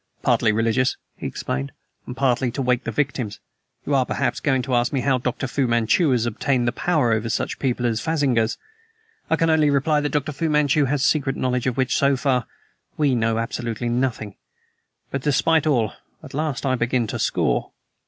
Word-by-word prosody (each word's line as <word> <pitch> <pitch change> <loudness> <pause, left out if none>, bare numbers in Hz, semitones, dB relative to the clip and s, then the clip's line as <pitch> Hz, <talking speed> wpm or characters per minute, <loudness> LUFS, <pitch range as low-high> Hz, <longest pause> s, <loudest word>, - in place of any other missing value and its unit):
"Partly 110 - +3
religious," 115 +4 +1 0.2
he - - -5
explained, 70 +1 -4 0.4
"and 125 - -7
partly 130 -2 +1
to 140 - -2
wake 125 0 +1
the 115 - -2
victims! 125 -5 -2 0.5
You 145 - -1
are 135 -2 +4
perhaps - - -1
going 130 -4 +1
to 130 - -3
ask 120 0 +2
me 135 - 0
how 135 -1 +2
Dr. 125 +2 -2
Fu 130 +1 0
Manchu 120 +8 +2
has 120 -3 +2
obtained 120 +1 0
power 155 -9 +1
over 110 +1 0
such - - -2
people 125 -2 -1
as 110 -2 0
phansigars? 130 -8 +1 0.7
I - - +3
can 165 -1 +2
only 155 -2 +4
reply 145 +2 +2
that 145 - -1
Dr. 150 +1 -1
Fu 160 +3 -2
Manchu 150 -1 +3
has 135 0 0
secret 140 -3 +1
knowledge 125 -1 -1
of 125 - -1
which, 130 -1 +1
so 140 -1 +3
far, 125 -3 0 0.5
we 145 -3 +2
know 115 -2 +1
absolutely 115 0 -3
nothing; 120 -4 -1 0.8
but, 135 - -2
despite 155 +2 +2
all, 115 - +1 0.3
at - - -11
last 145 -1 -2
I 130 - +2
begin 120 -1 0
to 105 - -4
score." - - 0
130 Hz, 190 wpm, -22 LUFS, 120-145 Hz, 0.8 s, are